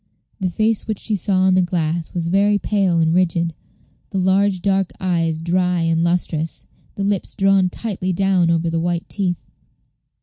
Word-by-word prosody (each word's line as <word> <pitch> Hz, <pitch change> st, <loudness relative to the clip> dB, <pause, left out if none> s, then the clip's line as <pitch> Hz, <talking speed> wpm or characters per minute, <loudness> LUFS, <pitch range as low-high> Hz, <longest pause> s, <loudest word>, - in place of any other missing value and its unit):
The 190 Hz, -2 st, -1 dB
face 215 Hz, +4 st, 0 dB
which 215 Hz, -2 st, -2 dB
she 215 Hz, -, -2 dB
saw 190 Hz, 0 st, +1 dB
in 190 Hz, -, +4 dB
the 185 Hz, -, +4 dB
glass 170 Hz, -2 st, -1 dB
was 170 Hz, -1 st, -1 dB
very 200 Hz, +3 st, +3 dB
pale 195 Hz, -4 st, +1 dB
and 160 Hz, 0 st, +2 dB
rigid; 170 Hz, -2 st, +1 dB, 0.6 s
the 195 Hz, -, -4 dB
large 190 Hz, 0 st, +2 dB
dark 195 Hz, -2 st, +1 dB
eyes 165 Hz, -3 st, 0 dB
dry 180 Hz, +1 st, 0 dB
and 165 Hz, 0 st, +1 dB
lustrous, 170 Hz, -2 st, -1 dB, 0.3 s
the 200 Hz, -, -3 dB
lips 200 Hz, -1 st, -1 dB
drawn 195 Hz, -1 st, +3 dB
tightly 190 Hz, -2 st, -3 dB
down 185 Hz, -1 st, +2 dB
over 165 Hz, 0 st, +1 dB
the 165 Hz, -, 0 dB
white 170 Hz, 0 st, -2 dB
teeth. 185 Hz, -4 st, -3 dB
180 Hz, 170 wpm, -20 LUFS, 170-195 Hz, 0.6 s, in